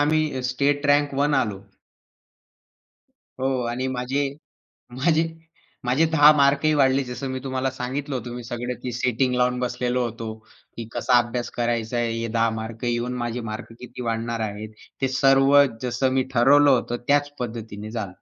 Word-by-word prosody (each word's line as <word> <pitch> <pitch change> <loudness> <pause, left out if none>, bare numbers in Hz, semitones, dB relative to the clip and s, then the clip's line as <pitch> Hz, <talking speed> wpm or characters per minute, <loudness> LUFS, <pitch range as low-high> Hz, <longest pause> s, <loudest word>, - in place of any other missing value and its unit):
आम्ही 150 -3 +1
state 145 +2 +1
rank 145 -1 +1
1 145 0 +2
आलो. 100 -3 -6 1.8
हो 130 - +1 0.2
आणि 130 +2 -2
माझे 135 +3 -1 0.8
माझे 160 -1 +4 0.6
माझे 135 +7 +3
10 150 -1 +8
मार्कही 140 +2 +3
वाढले, 135 -2 +3
जस 125 +2 -7
मी 130 -1 -3
तुम्हाला 130 0 -1
सांगितलं 135 +3 -4
होतं. 120 -1 -5
मी 125 - -7
सगळं 120 +1 -4
ती 125 - -3
सेटिंग 125 +1 0
लावून 125 0 +1
बसलेलो 125 0 -1
होतो. 115 -1 -5 0.4
की 115 - -6
कसा 125 - +3
अभ्यास 120 0 -3
करायचा 120 0 -1
आहे, 120 -1 0
हे 115 - -2
10 115 0 +1
मार्क 110 +1 -7
येऊन 120 +1 -1
माझे 120 0 -3
मार्क 110 +2 -7
किती 125 0 -9
वाढणार 115 0 -2
आहेत. 105 +1 -8 0.3
ते 135 - +2
सर्व 135 +1 +4 0.3
जसं 125 +1 0
मी 130 - +2
ठरवलं 140 +4 +5
होतं, 120 -1 +1
त्याच 145 0 +3
पद्धतीने 110 -3 -6
झालं. 110 -4 -3
125 Hz, 160 wpm, -23 LUFS, 120-135 Hz, 1.8 s, 10